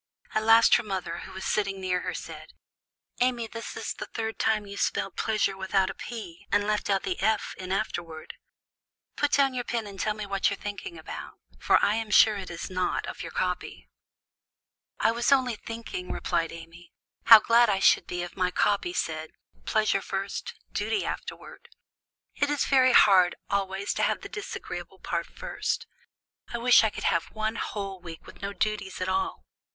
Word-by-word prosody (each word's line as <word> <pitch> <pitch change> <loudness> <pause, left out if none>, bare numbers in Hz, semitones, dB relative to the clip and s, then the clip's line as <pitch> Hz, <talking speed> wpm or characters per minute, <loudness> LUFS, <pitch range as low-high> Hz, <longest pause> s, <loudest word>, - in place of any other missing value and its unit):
At 215 - +2
last 225 +1 +6
her 240 - -3
mother, 185 -5 -4
who - - -9
was 190 0 -7
sitting 195 -2 0
near 185 -1 0
her, - - -4
said, - - -8 0.7
"Amy, 245 -2 +1
this 230 +1 -7
is - - -3
the - - -7
third 225 -1 -4
time 215 -1 +1
you 200 - -9
have 200 - -7
spelled 195 - -1
pleasure 215 -3 0
without 190 0 +1
a - - -9
'p,' 200 -9 -8
and 205 0 +3
left 210 0 -1
out 195 -1 +2
the 370 - -2
'f' 220 -1 +1
in 185 0 -6
afterward. 170 -6 -3 0.8
Put 295 -1 +1
down 275 -2 +4
your 250 -1 -2
pen 235 -2 -2
and 200 -1 -9
tell 215 -1 0
me 210 -1 -5
what 195 -1 +1
you 200 - -2
are - - -22
thinking 205 -4 -6
about; 160 - -8 0.2
for - - +4
I 205 - +2
am 225 -1 -3
sure 215 0 +6
it 190 -2 -6
is 170 -1 -5
not 185 -1 -1
of - - -7
your - - -6
copy." 65 - -3 1.1
"I 225 - +4
was 235 +3 0
only 255 -4 +3
thinking," 225 -5 -6
replied 165 -1 -1
Amy, 165 +1 -12 0.3
"how 225 -1 +11
glad 230 +2 +4
I 195 - +2
should 195 - +4
be 175 0 -3
if 175 - -8
my 185 -1 +1
copy 205 - +1
said, 160 - -3 0.3
'Pleasure 215 -2 +2
first 195 +1 -4 0.2
duty 420 - -1
afterward.' 480 - -7 0.6
It 285 - 0
is 295 -1 +1
very 255 -2 +5
hard 185 -3 +6 0.2
always 195 0 -1
to - - -2
have - - +1
the - - -8
disagreeable 415 -2 -7
part - - -3
first. - - -3 0.7
I 235 - -2
wish 245 0 +6
I 220 - +3
could - - -8
have 170 - +2
one 220 0 -3
whole 195 -3 -4
week 165 -2 -10
with - - -14
no 200 +1 -3
duties 205 -2 -2
at 185 - -2
all! 190 - -1
200 Hz, 190 wpm, -27 LUFS, 185-225 Hz, 1.1 s, how